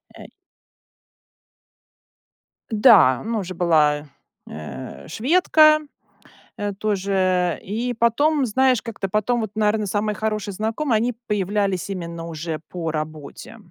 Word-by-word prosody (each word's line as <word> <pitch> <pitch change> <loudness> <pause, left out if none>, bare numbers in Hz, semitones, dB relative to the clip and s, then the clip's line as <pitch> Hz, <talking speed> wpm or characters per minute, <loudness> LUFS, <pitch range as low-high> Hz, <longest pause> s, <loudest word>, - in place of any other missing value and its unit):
Э - - -11 2.5
Да, 210 - +6
она 225 0 -3
уже 185 -2 -5
была, 150 -4 +2 0.4
э, 80 +12 -9
шведка, 310 - +4 0.8
э, 205 -1 -3
тоже, 190 -3 0
и 235 +5 -3
потом, 280 +5 +2
знаешь, 255 +1 +2
как-то 225 -4 -5
потом, 215 +5 0
вот, 220 - -4
наверно, 215 0 +1
самые 210 +2 -1
хорошие 215 -1 -3
знакомые, 225 +4 -1
они 240 +3 0
появлялись 200 -2 -1
именно 170 -3 -5
уже 160 -1 -5
по 165 -3 -4
работе. 155 +6 -7
205 Hz, 110 wpm, -22 LUFS, 175-230 Hz, 2.5 s, Да